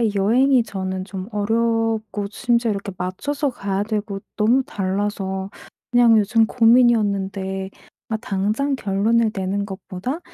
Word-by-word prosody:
여행이 245 +6 +4
저는 190 -3 -4
좀 190 -1 -7
어렵고 220 -1 0
심지어 235 0 +1
이렇게 200 -1 -4
맞춰서 280 +11 -2
가야 200 -4 -2
되고 210 -2 -3 0.2
너무 235 +5 +3
달라서 195 -4 -2 0.4
그냥 240 -2 +6
요즘 220 +2 +3
고민이었는데 200 -5 +2 0.4
아 220 - -1
당장 215 +8 -1
결론을 220 +1 +1
내는 195 +1 -2
것보다 195 - -5
210 Hz, 280 characters per minute, -21 LUFS, 195-230 Hz, 0.4 s, 그냥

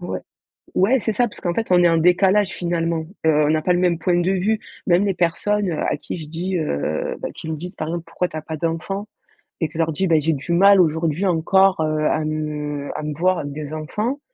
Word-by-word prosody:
Ouais. 175 - -4 0.6
Ouais, 235 +8 +4
c'est 220 - 0
ça 240 +4 +2
parce 215 - -12
qu'en 175 - -1
fait 225 +4 -2
on 175 -1 +5
est 175 - +6
en 165 - +3
décalage, 190 +4 +4
finalement, 170 -2 -2 0.2
heu, 160 - +5
on - - +1
n'a 155 0 +2
pas 180 +3 +2
le 175 - +1
même 175 -2 +2
point 175 +1 +1
de 180 +2 +1
vue. 205 +3 +1 0.3
Même 180 +3 +4
les 195 - +1
personnes, 190 +3 0
heu, 155 - -3
à - - 0
qui - - -6
je 155 -3 -8
dis, 180 +3 -2
heu, 75 - -2
bah, - - -4
qui 160 - -8
me 155 - -3
disent, 180 +4 -8
par 155 - -4
exemple: 170 0 -3
«Pourquoi 180 +2 -1
tu 155 - -6
as - - -4
pas 155 0 -6
d'enfants?» 170 +6 -3 0.5
et 160 - 0
que 155 - -10
leur 160 -1 +1
dis: 190 +5 0
«Bah, 165 - +3
j'ai 160 +2 +1
du 140 +4 -5
mal 195 +2 +6
aujourd'hui 160 +2 0
encore, 190 +2 +3
heu, 155 0 0
à 155 - 0
me 150 -2 -3
à 155 - -4
me 150 0 -3
voir 180 +1 +2
avec 145 -1 -5
des 150 0 -6
enfants», 210 - -3
170 Hz, 250 wpm, -21 LUFS, 155-190 Hz, 0.6 s, est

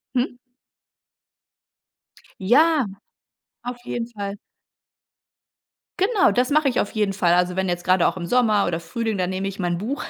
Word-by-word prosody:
Mhm. 245 0 -1 2.0
Ja, 280 - +4 0.8
auf 245 +1 -5
jeden 235 -2 -3
Fall. 205 -3 -6 1.6
Genau, 390 - +3
das 250 +4 +1
mache 295 -1 +3
ich 245 - -1
auf 205 - -1
jeden 210 -3 0
Fall. 180 -3 +2
Also, 180 0 +1
wenn 190 -1 -1
jetzt 175 0 -2
gerade 185 -1 +3
auch - - -2
im 175 - -4
Sommer 215 -2 +2
oder 170 -1 -1
Frühling 220 +6 -3
dann 180 -1 -1
nehme 190 +1 -3
ich 195 0 -7
mein 175 -1 -1
Buch, 235 - -4
205 Hz, 155 wpm, -22 LUFS, 185-245 Hz, 2.0 s, Ja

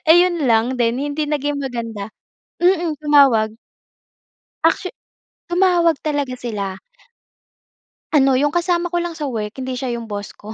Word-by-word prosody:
ayon 345 -1 +5
lang 235 +1 +2
din, 240 +1 +1
hindi 290 +1 -2
naging 290 -1 -1
maganda. 230 -6 -5 0.5
Mm, 350 -3 +3
tumawag. 260 -7 +4 1.1
Actu 330 +3 +2 0.6
tumawag 350 -2 +3
talaga 290 -4 -1
sila. 205 -6 -5 1.3
Ano, 270 -3 +4
yung 290 +2 +1
kasama 345 0 0
ko 345 - +1
lang 340 -1 -5
sa 300 - -3
work 220 -5 -4
hindi 260 0 -4
siya 250 -1 -3
yung 235 - -7
boss 205 -2 -7
ko. 215 +1 -9
275 Hz, 135 wpm, -20 LUFS, 230-330 Hz, 1.3 s, ayon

